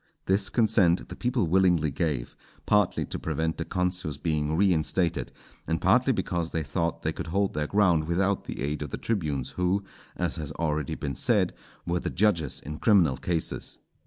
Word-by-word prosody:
This 95 +1 +2
consent 105 -7 +3
the - - -7
people 125 -4 0
willingly 85 -3 +3
gave, 70 -4 -2 0.3
partly 105 -3 +2
to - - -5
prevent 80 0 -2
the 80 - -2
consuls 90 -5 -2
being 75 0 -1
reinstated, 90 -2 +1 0.4
and 80 0 0
partly - - +4
because 85 -2 -1
they 80 - -2
thought 85 +4 -2
they - - 0
could - - -6
hold 100 +4 0
their 75 0 -1
ground 90 -6 +3
without 95 +4 0
the - - -6
aid 75 +2 -2
of 75 - -4
the - - -4
tribunes, 75 - -2
who, 90 +2 0 0.3
as - - -1
has 75 -2 -4
already 75 -3 -1
been 70 -2 -4
said, - - +1 0.3
were 85 +1 0
the - - -3
judges 85 -8 +1
in 75 +2 -7
criminal 90 - +4
cases. 80 +4 -2
85 Hz, 175 wpm, -27 LUFS, 75-95 Hz, 0.4 s, partly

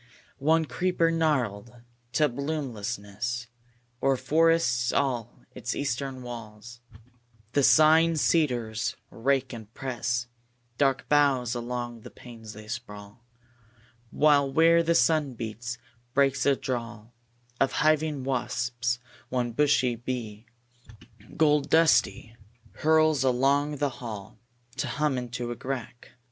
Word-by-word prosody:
2. 135 - -10
One 160 +1 +4
creeper, 175 0 0
gnarled 125 -9 -1 0.4
to 150 +3 +3
bloomlessness, 120 -5 -4 0.6
O'er 135 -1 +2
forests 155 -6 +2
all 125 -4 -2
its 120 - -4
eastern 135 -1 -3
wall; 115 -3 -8 0.9
The 145 - +2
sighing 160 +3 +5
cedars 125 -9 0 0.2
rake 135 +2 0
and 110 -2 -9
press 120 -2 -2 0.5
Dark 135 -2 +1
boughs 135 -5 +3
along 120 -1 -4
the - - -11
panes 115 -3 -12
they 110 0 -12
sprawl; 110 -1 -8 0.9
While, 145 -1 +3
where 165 +3 +5
the 170 0 +1
sun 145 0 +2
beats, 115 +1 -5 0.4
breaks 135 -1 +2
a 140 - +5
drawl 120 -3 -5 0.5
Of 135 - +2
hiving 155 -2 +1
wasps; 125 -2 -1 0.3
one 125 -2 -1
bushy 130 -2 +2
bee, 115 -2 -6 0.9
Gold 150 -2 +3
dusty, 160 -7 +3 0.4
hurls 155 -2 +3
along 140 +3 +2
the 145 0 0
hall 105 -4 -8 0.4
To 140 +3 -1
hum 150 -3 0
into 120 0 -5
a - - -4
crack. 125 -2 -6
130 Hz, 115 wpm, -27 LUFS, 120-145 Hz, 0.9 s, sighing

